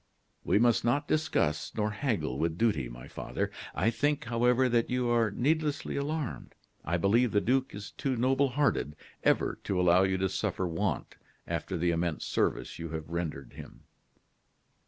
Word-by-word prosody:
"We - - +3
must 120 +1 +3
not 140 +5 +1
discuss 115 - 0
nor 105 0 0
haggle 105 - -1
with 80 0 0
duty, 105 - +1
my - - -10
father. - - -3 0.2
I 115 - +2
think, 145 +4 0
however, 125 +2 +3
that 120 -2 +1
you 125 -1 0
are 115 -2 +3
needlessly 150 +7 0
alarmed. 145 -1 -3 0.3
I 85 +3 0
believe 110 +6 +3
the 105 - +3
duke 130 +3 0
is 100 0 -7
too 135 -2 -2
noble 130 +3 +2
hearted 125 - 0 0.3
ever - - +2
to 95 - -1
allow 90 0 +5
you 95 0 +2
to 95 +1 +1
suffer 95 - -2
want 85 -1 -2 0.3
after 95 - -3
the 85 +1 +1
immense 85 -1 -1
service - - -1
you 85 0 -5
have 80 0 -5
rendered 85 -5 -4
him." - - -11
110 Hz, 165 wpm, -30 LUFS, 85-130 Hz, 0.3 s, allow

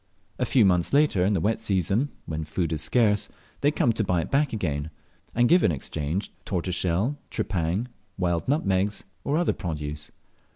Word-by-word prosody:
A 125 - +1
few 120 -4 +5
months 90 +1 +2
later, 145 -11 +4
in 100 +3 +2
the 95 - +2
wet 110 +7 0
season, 105 - +1 0.2
when 80 0 -3
food 80 +1 -2
is 80 - -1
scarce, 105 +5 +2 0.3
they 145 - +3
come 125 -5 +2
to 110 - 0
buy 90 -3 +1
it - - -6
back 140 +1 +2
again, 75 -8 -2 0.5
and 120 +1 +4
give 175 +5 +5
in - - +4
exchange 75 +5 -3
tortoiseshell, 95 - -1
tripang, 95 -1 -1 0.3
wild 85 -3 0
nutmegs, 100 -8 +1 0.2
or 145 +2 +1
other 175 - +2
produce. 75 -3 -4
95 Hz, 170 wpm, -26 LUFS, 85-115 Hz, 0.5 s, few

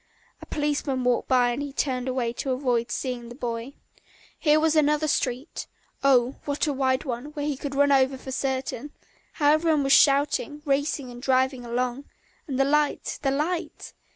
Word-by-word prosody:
A - - -11
policeman 290 -3 -1
walked 245 -1 +1
by 250 -2 +3
and 280 +3 -5
turned 255 -2 -1
away 250 -2 -1
to 270 - -4
avoid 250 -3 0
seeing 245 -3 -4
the 240 - -9
boy. 240 0 -4 0.7
Here 300 0 +4
was 320 0 +2
another 300 0 +3
street 260 -1 -2 0.4
oh, 255 -1 +3
what 285 +2 0
a 295 - 0
wide 260 0 +1
one, 245 -2 -4
here 290 - -3
he 290 -2 -2
would 280 -1 -4
be - - -5
run 285 0 +4
over 265 -1 +3
for 265 0 -8
certain; 265 +1 -3 0.4
how 290 -2 +3
everyone 310 -1 +2
was 275 +1 +3
shouting, 290 +1 +3
racing 280 -2 -1
and 240 0 -10
driving 260 -1 +1
along, 245 +3 -2 0.4
and 270 -3 -3
the 270 - +4
light, 295 +1 0
the 275 - +1
light! 310 +6 -3
270 Hz, 180 wpm, -25 LUFS, 255-290 Hz, 0.7 s, Here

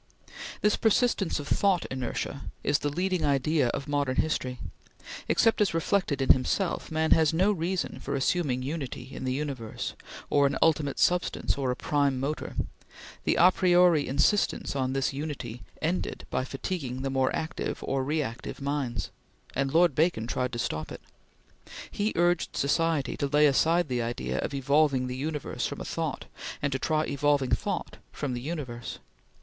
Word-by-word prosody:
This 210 0 +3
persistence 220 -6 +2
of 145 - -6
thought 195 0 +2
inertia 130 +2 -3 0.2
is 145 - +2
the 145 - -1
leading 180 +3 -1
idea 140 0 +2
of 140 +4 -3
modern 145 -3 0
history. 130 -5 0 0.7
Except 225 -1 +3
as 200 -5 +2
reflected 165 -4 +1
in - - +8
himself, 170 +8 -1
man 160 0 0
has 160 -1 +4
no 190 +5 +4
reason 180 0 -2
for - - -3
assuming 135 -2 0
unity 140 -2 -5
in - - -5
the 130 - 0
universe, 130 -5 -4 0.3
or 145 -1 +4
an 140 - -1
ultimate 150 -3 +2
substance, 180 0 +1
or 135 -2 -1
a 125 - 0
prime 140 -1 +1
motor. 145 +3 -3 0.7
The - - +3
a 180 +2 +7
priori 175 -4 +4
insistence 145 +5 +1
on 130 -1 0
this 135 0 0
unity 135 -5 -5 0.2
ended 175 +4 -2
by 130 - 0
fatiguing 135 -3 -4
the 135 - -1
more 130 -1 +2
active 160 +1 -3
or 135 -1 0
reactive 135 -4 -3
minds; 140 -3 -2 0.4
and 135 0 0
Lord 170 0 +4
Bacon 155 -6 +1
tried 125 +1 -1
to - - -2
stop 80 -9 -3
it. - - -8 0.9
He 210 +2 0
urged 175 0 +1
society 155 0 +1
to 140 - 0
lay 150 +2 +4
aside 165 +4 +3
the 125 -2 -1
idea 115 +1 -2
of - - -2
evolving 140 -1 +3
the 125 0 -4
universe 150 +2 -3
from - - -6
a - - -5
thought, - - -3 0.3
and 145 - -1
to 135 - -1
try 155 +2 +1
evolving 140 -2 +1
thought 200 -4 -1
from 140 -4 -3
the 120 - -4
universe. 130 -6 -5
145 Hz, 165 wpm, -28 LUFS, 130-165 Hz, 0.9 s, in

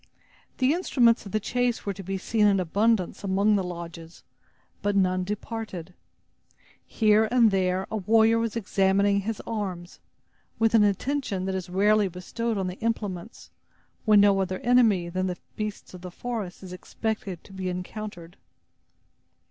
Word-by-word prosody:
The 260 +3 +3
instruments 240 - +2
of - - -9
the 215 - +1
chase 245 +2 -1
were 200 - -1
to 195 - -9
be 195 +1 -3
seen 210 +2 +2
in 200 -1 +3
abundance 200 +3 0
among 200 +2 +2
the 195 - +1
lodges; 170 -1 -8 0.6
but 205 0 0
none 185 -1 +2
departed. 205 -3 -6 0.9
Here 215 0 +3
and 235 -2 +4
there 185 0 0
a 220 - -1
warrior 225 +3 +4
was 230 -1 -2
examining 200 -1 +2
his 215 +1 -4
arms, 190 -5 -5 0.6
with 225 0 +2
an 220 -2 +6
attention 205 -1 -1
that 190 - -2
is 185 -1 -4
rarely 205 +2 +3
bestowed 215 +5 -4
on 190 - -1
the 180 +1 -5
implements, 215 -3 -4 0.5
when 215 -2 +6
no 200 -1 +4
other 185 0 -2
enemy 225 -8 +3
than 185 +2 -2
the 180 -1 -3 0.2
beasts 210 -2 -5
of 180 - -10
the 180 - -7
forest 210 -2 -5
is 185 -1 -8
expected 195 -1 -4
to 195 - -15
be 190 -1 -3
encountered. 180 -1 -7
200 Hz, 155 wpm, -26 LUFS, 185-220 Hz, 0.9 s, an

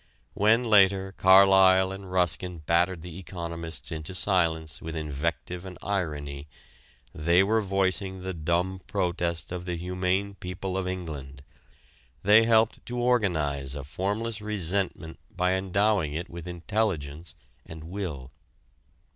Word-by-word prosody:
When 110 +4 +3
later, 95 -3 +4
Carlyle 95 0 +6
and 95 -1 -8
Ruskin 90 -2 -1
battered 85 +1 +2
the 90 0 -8
economists 85 -4 -6
into 80 +3 -6
silence 80 -7 +1
with 80 0 -6
invective 80 +4 -3
and 95 -2 -9
irony 75 -7 -3 0.7
they 85 +4 +3
were 110 +3 +2
voicing 95 -1 -1
the 95 0 -3
dumb 85 +3 -1
protest 85 -3 -2
of 90 0 -5
the 90 -1 -2
humane 90 +3 -1
people 90 0 -5
of 95 -1 -1
England. 75 -7 -6 0.8
They 105 +3 +6
helped 110 0 +3
to 120 - -4
organize 80 - 0
a 70 - -5
formless 105 +8 -3
resentment 95 -4 -2
by 90 0 0
endowing 95 -4 +1
it 85 +3 -5
with 85 0 -8
intelligence 85 -4 -3 0.3
and 80 -1 -10
will. 80 -7 -6
90 Hz, 125 wpm, -27 LUFS, 80-95 Hz, 0.8 s, Carlyle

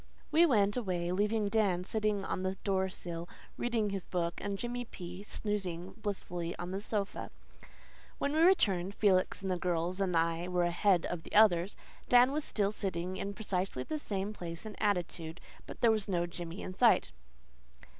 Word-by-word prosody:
We 335 +2 +6
went 205 -7 +3
away, 180 -7 -1
leaving 210 +3 +1
Dan 200 -4 +2
sitting 210 0 0
on 185 - -2
the 190 0 -1
door 190 -1 +1
sill 170 -2 -6 0.3
reading 230 -4 0
his 195 -2 -4
book, 170 -2 -1
and 200 0 -2
Jimmy 245 +2 -3
P. 180 -5 -8
snoozing 190 -4 -3
blissfully 180 -5 -4
on 175 +1 -5
the 195 +1 -3
sofa. 205 -1 -3 0.9
When 280 - -1
we 310 - +2
returned 200 - +4
Felix 195 -1 +2
and 190 - -1
the 180 - -1
girls 175 +1 -1
and 180 -3 +2
I 165 +1 +1
were 180 -1 +1
ahead 175 +1 +3
of 175 -2 -3
the - - -9
others 200 -3 +5 0.3
Dan 245 +1 +7
was 300 +1 -1
still 205 -6 +1
sitting 185 -3 -3
in 200 0 -4
precisely 185 - -2
the 305 - -3
same 200 -5 -3
place 170 -1 -6
and 215 - -7
attitude; 175 -5 -1 0.3
but - - -9
there 235 - +6
was 215 -2 0
no 175 -3 +1
Jimmy 175 +1 -6
in 185 - -5
sight. 185 - +4
195 Hz, 175 wpm, -32 LUFS, 175-210 Hz, 0.9 s, Dan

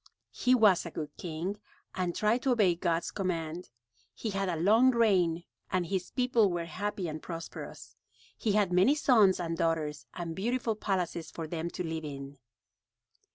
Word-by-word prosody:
He 255 +1 +3
was 210 -7 +5
a 170 - -6
good 155 -2 -6
king 175 +4 -4 0.4
and 180 -2 -2
tried 220 +4 +2
to 260 -1 +2
obey 205 -7 +4
God's 170 0 -1
command. 175 -3 -3 0.5
He 220 - -3
had 195 -1 -1
a 175 - 0
long 215 +10 +5
reign 185 -9 +2 0.3
and 185 -1 +1
his 185 +1 -2
people 245 -5 +2
were 175 -1 -2
happy 195 +3 -3
and 155 -1 -5
prosperous. 165 -1 -8 0.4
He 215 - -1
had 200 -4 +2
many 190 +11 +5
sons 220 -11 +4
and 165 -1 -2
daughters 160 -3 -1
and 170 -2 -4
beautiful 235 +2 -1
palaces 180 -5 -2
for 165 - -6
them 165 +1 -3
to 180 - -5
live 160 -1 -4
in. 140 -1 -8
180 Hz, 165 wpm, -30 LUFS, 165-210 Hz, 0.5 s, was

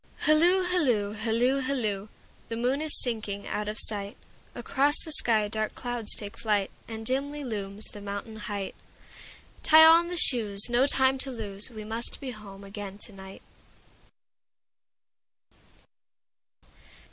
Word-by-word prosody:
Hilloo, 345 +5 +4
hilloo, 255 - 0
hilloo, 230 +5 +1
hilloo! 220 -7 -2 0.4
The 230 - -4
moon 255 +5 0
is 310 -1 +4
sinking 215 -4 -3
out 210 0 -3
of 215 +1 -5
sight, 205 -1 -1 0.4
Across 275 +4 +1
the 315 - -6
sky 220 -7 +3
dark 215 0 -2
clouds 245 -3 -3
take 205 -1 -6
flight, 205 -3 0 0.2
And 225 -1 -7
dimly 285 +4 -2
looms 205 -4 -1
the 205 - -5
mountain 200 +2 -7
height; 205 -2 -5 0.9
Tie 315 +1 +7
on 335 +1 +6
the 355 0 -4
shoes, 220 -7 +2
no 250 +3 +3
time 265 -1 +2
to 270 - +2
lose, 210 -4 -1
We 215 -3 -9
must 225 +2 -2
be 265 -2 -6
home 200 -3 -12
again 200 0 -8
to 210 +1 -6
night. 190 0 -12
225 Hz, 135 wpm, -27 LUFS, 205-270 Hz, 0.9 s, Tie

